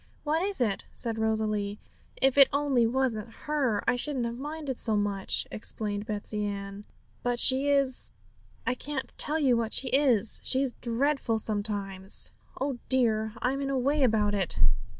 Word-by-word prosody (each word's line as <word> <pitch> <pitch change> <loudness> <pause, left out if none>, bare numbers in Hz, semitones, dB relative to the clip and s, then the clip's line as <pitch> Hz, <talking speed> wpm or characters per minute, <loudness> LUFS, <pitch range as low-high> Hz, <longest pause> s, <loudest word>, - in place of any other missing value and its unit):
'What 310 +2 0
is 395 +1 -1
it?' 215 -5 -1
said 225 -1 -2
Rosalie. 215 -2 -1 0.4
'If 270 -1 +3
it 275 -2 +7
only 275 -5 +2
wasn't 235 -3 -2
her, 275 -9 0
I - - +3
shouldn't 255 -1 +1
have 235 +1 -5
minded 295 -2 -5
so 220 -2 +3
much,' 200 -2 0
explained 210 -1 -3
Betsey 210 0 -4
Ann; 200 0 -6 0.3
'but 245 0 -1
she 270 +3 +6
is 275 -2 +1 0.6
I 255 - +1
can't 265 +1 -5
tell 305 +2 +2
you 270 -6 +3
what 230 -1 -1
she 260 - +2
is; 250 -6 +3
she's 265 -1 +2
dreadful 245 0 -1
sometimes. 205 -3 0 0.3
Oh 270 -2 -2
dear! 220 -4 +2
I 250 - +2
am 275 +1 -3
in 275 - -2
a 275 - 0
way 280 +4 +1
about 215 -5 +2
it!' 195 -4 0
240 Hz, 165 wpm, -28 LUFS, 215-275 Hz, 0.6 s, it